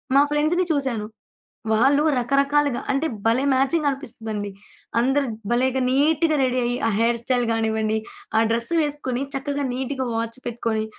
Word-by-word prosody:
మా 280 - +7
ఫ్రెండ్స్‌ని 310 +5 +2
చూసాను. 260 -8 -1 0.7
వాళ్ళు 275 +6 +4
రకరకాలుగా 280 +1 +2
అంటే 275 +4 0 0.2
భలే 230 +4 +3
మ్యాచింగ్ 285 +4 +2
అనిపిస్తదండి. 220 -7 -5 0.5
అందరు 270 +3 +2 0.2
భలేగా 260 +2 +1
నీట్‌గా 305 +3 +2
రెడీ 255 0 +1
అయ్యి 245 +1 -1
ఆ - - +2
హెయిర్ 235 0 +2
స్టైల్ 245 -1 +1
గానివ్వండి, 220 -1 0 0.4
ఆ - - +6
డ్రెస్సు 235 +9 0
వేసుకొని, 280 -3 -2
చక్కగా 285 +1 -2
నీట్‌గా 260 0 -3
వాచ్ 230 +2 -3
పెట్టుకొని, 225 -2 -2
260 Hz, 135 wpm, -23 LUFS, 230-285 Hz, 0.7 s, మా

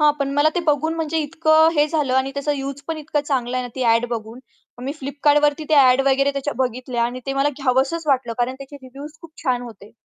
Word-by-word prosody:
हां, 300 0 +6
पण 280 -1 -1
मला 290 +2 +4
ते 355 - +1
बघून 310 +2 +1
म्हणजे 325 -1 -2
इतकं 315 +1 +3
हे 295 -1 +3
झालं 290 -5 0
आणि 265 +1 +1
त्याचा 280 +1 -1
यूज 275 0 -5
पण 325 - -2
इतकं 300 0 -2
चांगलं 255 -3 -1
आहे 255 - -1
ना - - -9
ती 260 - -3
ॲड 230 +1 +3
बघून, 225 0 -5 0.4
मग 250 - -8
मी 275 - -2
Flipkartवरती 290 +2 +2
त्या 300 -3 +6
ॲड 255 +1 +4
वगैरे 275 +1 +2
त्याच्या 280 +1 -3
बघितल्या 250 -1 -2
आणि 245 +2 -4
ते 270 - -1
मला 275 +1 +2
घ्यावंसंच 270 +4 0
वाटलं 260 -4 +1
कारण 245 +1 0
त्याचे 275 +1 -10
रिव्ह्यूज 280 +3 -11
खूप 330 - -13
छान 255 -5 0
होते. 215 -4 -12
275 Hz, 235 wpm, -21 LUFS, 255-295 Hz, 0.4 s, हां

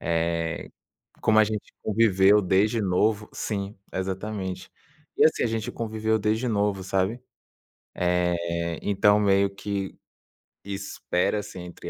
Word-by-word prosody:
eh, 85 0 -1 0.5
como 110 -1 +4
a - - +6
gente 105 0 -5
conviveu 105 -2 +4
desde 105 +4 +2
novo 105 +2 +1
sim, 100 -1 -4 0.2
exatamente. 95 0 -4 0.5
E - - +5
assim, - - +3
a - - +3
gente 110 -1 -3
conviveu 110 -1 -1
desde 110 +3 0
novo, 100 -4 0
sabe, 95 +5 0 0.7
eh, 85 -1 0
então 105 +1 +4
meio 100 -1 +3
que 100 -1 -4 0.7
"espera-se", 100 0 -2
entre 90 0 -8
100 Hz, 115 wpm, -26 LUFS, 90-105 Hz, 0.7 s, a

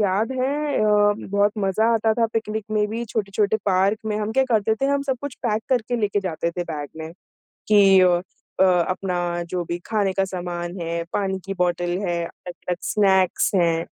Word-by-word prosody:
याद 205 +4 +1
है। 280 +3 -1
अ, 210 -1 +4 0.2
बहुत 200 +1 +2
मज़ा 200 +2 +1
आता 220 0 +2
था 230 -1 +2
पिकनिक 220 -1 -2
में 210 -1 +1
भी, 230 +2 -3
छोटे-छोटे 210 -1 0
पार्क 195 +2 +2
में 210 -1 -1
हम 215 +1 -2
क्या 265 +3 +3
करते 220 -3 +1
थे 270 - +2
हम 280 0 +1
सब 265 - +1
कुछ 285 -2 -5
पैक 220 -3 0
करके 245 -2 0
लेके 205 -2 0
जाते 170 -3 -2
थे 175 +1 -3
बैग 145 -2 -4
में 160 +1 -7 0.6
कि 200 -2 +6
अ 175 -1 +4 0.4
अ, - - +6
अपना 185 0 +1 0.3
जो 180 0 -2
भी 170 +1 -3
खाने 210 -3 0
का 195 - +1
सामान 175 -2 -5
है, 170 0 -3
पानी 190 -1 -1
की 195 - -3
बॉटल 175 0 0
है, 180 -4 -1
अलग-अलग 180 +1 -6
स्नैक्स 190 -3 +3
हैं 170 -2 +2
200 Hz, 190 wpm, -23 LUFS, 180-220 Hz, 0.6 s, कि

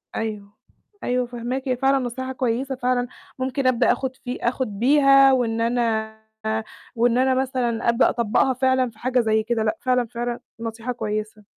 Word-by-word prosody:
أيوه. 210 -2 -5 0.5
أيوه 250 0 0
فاهماكِ، 245 +3 -4
هي 255 -1 0
فعلًا 270 +2 +3
نصيحة 260 +1 -4
كويسة 260 +1 -1
فعلًا، 250 -1 0 0.3
ممكن 260 +1 -1
أبدأ 250 -1 +3
آخُد 260 -1 -2
في 250 -1 -6
آخُد 250 +2 0
بيها 275 +1 +6
وإن 230 -3 0
أنا 225 -2 0 0.8
وإن 240 +1 +2
أنا 260 0 +3
مثلًا 245 -3 -1
أبدأ 235 +2 +4
أطبّقها 235 +3 +1
فعلًا 260 0 +2
في 220 -1 -20
حاجة 255 +1 +1
زي 220 -2 +2
كده، 225 0 -1
لأ، 220 0 0
فعلًا، 250 -1 +1
فعلًا 240 +1 -4 0.2
نصيحة 225 +1 -4
كويسة. 215 -2 -4
245 Hz, 160 wpm, -23 LUFS, 230-260 Hz, 0.8 s, بيها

